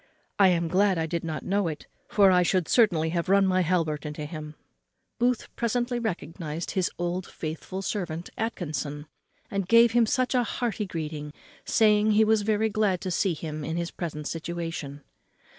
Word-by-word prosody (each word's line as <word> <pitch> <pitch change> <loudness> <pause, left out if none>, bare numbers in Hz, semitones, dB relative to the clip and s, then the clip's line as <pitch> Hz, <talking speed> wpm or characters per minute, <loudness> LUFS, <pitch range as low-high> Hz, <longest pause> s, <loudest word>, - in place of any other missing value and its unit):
I 195 - +7
am 170 -2 +2
glad 190 +2 +3
I 160 - 0
did 170 +1 -3
not 160 -2 -4
know 200 -1 +1
it, 155 -2 -5 0.2
for 200 -2 +5
I 180 -1 +5
should 180 -2 +1
certainly 175 -9 +3
have 170 +2 -2
run 195 0 +5
my 185 -1 +2
halbert 165 -4 0
into 150 0 -5
him." 150 -1 -7 0.6
Booth 245 0 0
presently 240 +1 0
recognised 170 -6 -4
his 185 -3 0
old 175 +1 -2
faithful 170 +4 -6
servant 175 -5 -4
Atkinson, 155 -9 -3 0.5
and 195 -2 -2
gave 230 +2 +6
him 235 -1 +4 0.3
a 250 -1 +3
hearty 225 -4 -2
greeting, 150 -3 -5 0.3
saying 215 -1 +4
he 220 +1 +5
was 220 0 +3
very 215 +1 +1
glad 205 -4 +1
to 185 - -3
see 175 0 +1
him 155 -1 -5
in 160 +3 -3
his 170 0 -2
present 150 -4 -5
situation. 165 -4 -5
180 Hz, 170 wpm, -27 LUFS, 160-210 Hz, 0.6 s, I